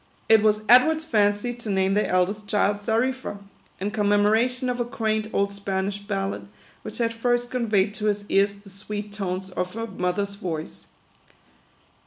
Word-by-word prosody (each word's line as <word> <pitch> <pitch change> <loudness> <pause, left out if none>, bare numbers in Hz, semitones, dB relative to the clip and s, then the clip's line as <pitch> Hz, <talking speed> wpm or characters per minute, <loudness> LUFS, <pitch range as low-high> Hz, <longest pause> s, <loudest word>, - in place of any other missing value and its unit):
It 220 -1 +6
was 215 0 +2
Edward's 315 +6 +6
fancy 210 -2 +1
to 235 -2 -7
name 190 0 +2
their 210 +1 +1
eldest 195 +3 0
child 205 0 +2
Xarifa; 230 +3 -1 0.4
in 200 +2 -2
commemoration 220 +5 +2
of 250 0 -2
a - - +2
quaint 220 -3 -1
old 200 0 +1
Spanish 200 0 -3
ballad, 195 - -3 0.3
which - - -8
had 230 -1 0
first 240 +1 0
conveyed 210 -5 +1
to 210 - -5
his 205 -1 0
ears 200 0 +2
the 200 0 -16
sweet 205 +1 -6
tones 190 -2 -4
of 180 +1 -3
her 230 0 -3
mother's 200 0 -2
voice. 170 -6 -6
205 Hz, 160 wpm, -24 LUFS, 200-230 Hz, 0.4 s, It